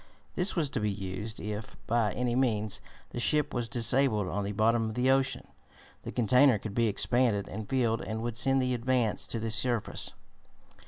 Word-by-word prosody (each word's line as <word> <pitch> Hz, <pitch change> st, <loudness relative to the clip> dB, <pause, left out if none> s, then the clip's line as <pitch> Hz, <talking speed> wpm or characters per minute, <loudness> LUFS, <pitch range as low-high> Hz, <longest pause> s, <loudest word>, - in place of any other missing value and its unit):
This 180 Hz, +3 st, +2 dB
was 155 Hz, -6 st, 0 dB
to -, -, -1 dB
be 105 Hz, -1 st, 0 dB
used 100 Hz, +2 st, -5 dB
if, 105 Hz, +1 st, -6 dB
by 115 Hz, -2 st, +1 dB
any 125 Hz, -1 st, -1 dB
means, 110 Hz, -5 st, 0 dB, 0.3 s
the -, -, -5 dB
ship 150 Hz, +4 st, +2 dB
was 120 Hz, -2 st, -2 dB
disabled 120 Hz, -4 st, +1 dB
on 105 Hz, -, -2 dB
the 100 Hz, -, -3 dB
bottom 115 Hz, +2 st, +2 dB
of 110 Hz, -, -7 dB
the 125 Hz, +2 st, +2 dB
ocean. 135 Hz, 0 st, 0 dB, 0.5 s
The -, -, -7 dB
container 125 Hz, +1 st, +4 dB
could 105 Hz, 0 st, -7 dB
be 115 Hz, +1 st, +2 dB
expanded 110 Hz, -1 st, +1 dB
and 105 Hz, +1 st, -7 dB
filled, 120 Hz, -4 st, +1 dB
and 110 Hz, +1 st, -4 dB
would 120 Hz, -1 st, -3 dB
send 135 Hz, +4 st, +2 dB
the 125 Hz, 0 st, 0 dB
Advance 120 Hz, -2 st, 0 dB
to -, -, -3 dB
the 110 Hz, 0 st, -3 dB
surface. 115 Hz, 0 st, 0 dB
115 Hz, 190 wpm, -29 LUFS, 105-125 Hz, 0.5 s, container